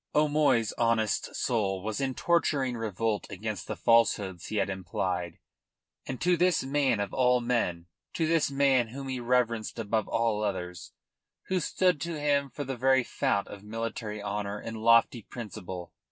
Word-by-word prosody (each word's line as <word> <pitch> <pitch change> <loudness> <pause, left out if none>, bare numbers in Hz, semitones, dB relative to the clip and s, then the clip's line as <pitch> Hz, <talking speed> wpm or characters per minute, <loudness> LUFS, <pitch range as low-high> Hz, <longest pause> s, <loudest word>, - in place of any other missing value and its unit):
O'Moy's 150 -6 +3
honest 115 -2 +1
soul 95 -5 0
was 110 +4 -3
in 135 -1 -1
torturing 145 -7 +1
revolt 110 -1 -2
against 105 +2 -5
the 110 - -3
falsehoods 100 -3 +2
he - - -5
had 105 - +1
implied 90 -2 -3 0.7
and 130 - -4
to 180 0 +3
this 180 +1 +2
man 135 -4 +1
of 100 -1 -3
all 125 -1 +3
men, 115 -9 -1 0.3
to 165 - 0
this 165 -2 +2
man 135 -3 +3
whom 135 +4 -7
he 130 -1 -2
reverenced 120 -2 0
above 110 -1 -1
all 115 -2 0
others, 90 -4 -4 0.6
who 185 -1 +2
stood 180 -1 +1
to 170 -2 -3
him 140 -1 +1
for 145 +4 -5
the 135 -1 -4
very 130 +1 +3
fount 100 -3 0
of 100 - -9
military 110 0 -5
honour 105 0 -3
and 110 +1 -6
lofty 115 +1 +4
principle! 95 -6 -8
115 Hz, 160 wpm, -29 LUFS, 105-135 Hz, 0.7 s, lofty